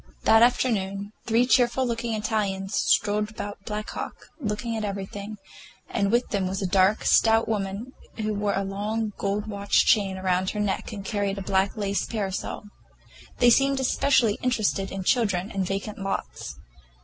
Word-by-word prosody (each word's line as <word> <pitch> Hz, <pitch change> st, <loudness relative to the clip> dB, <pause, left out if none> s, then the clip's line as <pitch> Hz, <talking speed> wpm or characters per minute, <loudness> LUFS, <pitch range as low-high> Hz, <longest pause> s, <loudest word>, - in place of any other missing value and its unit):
That 225 Hz, -, +6 dB
afternoon 205 Hz, -5 st, +1 dB
three 230 Hz, +2 st, +3 dB
cheerful 255 Hz, 0 st, +3 dB
looking 230 Hz, -1 st, -2 dB
Italians 205 Hz, -2 st, -2 dB
strolled 210 Hz, 0 st, +2 dB
about 205 Hz, -2 st, -7 dB
Black 210 Hz, 0 st, -4 dB
Hawk, -, -, -7 dB
looking 225 Hz, -1 st, -3 dB
at 220 Hz, -, -3 dB
everything, 200 Hz, +1 st, -5 dB, 0.5 s
and 200 Hz, 0 st, 0 dB
with 240 Hz, +2 st, +2 dB
them 195 Hz, -3 st, 0 dB
was 190 Hz, +1 st, -3 dB
a 195 Hz, -, -2 dB
dark, 190 Hz, +3 st, +3 dB
stout 225 Hz, 0 st, +4 dB
woman 210 Hz, +4 st, -3 dB, 0.2 s
who 215 Hz, -1 st, -1 dB
wore 205 Hz, 0 st, 0 dB
a 195 Hz, -, 0 dB
long 210 Hz, +2 st, -2 dB
gold 205 Hz, +1 st, -1 dB
watch 200 Hz, -2 st, +1 dB
chain 200 Hz, -5 st, +3 dB
about 185 Hz, 0 st, 0 dB
her 210 Hz, -, -4 dB
neck 205 Hz, -2 st, -1 dB
and 200 Hz, -2 st, -7 dB
carried 200 Hz, -1 st, -1 dB
a 195 Hz, -, -4 dB
black 190 Hz, +2 st, +1 dB
lace 200 Hz, -1 st, -1 dB
parasol. 200 Hz, -4 st, -3 dB, 0.7 s
They 245 Hz, -1 st, +5 dB
seemed 275 Hz, +2 st, +3 dB
especially 255 Hz, -4 st, +2 dB
interested 215 Hz, -5 st, 0 dB
in 195 Hz, -1 st, -4 dB
children 205 Hz, -3 st, +1 dB
and 190 Hz, -2 st, -1 dB
vacant 200 Hz, +2 st, -4 dB
lots. 195 Hz, -, -4 dB
205 Hz, 160 wpm, -25 LUFS, 195-225 Hz, 0.7 s, That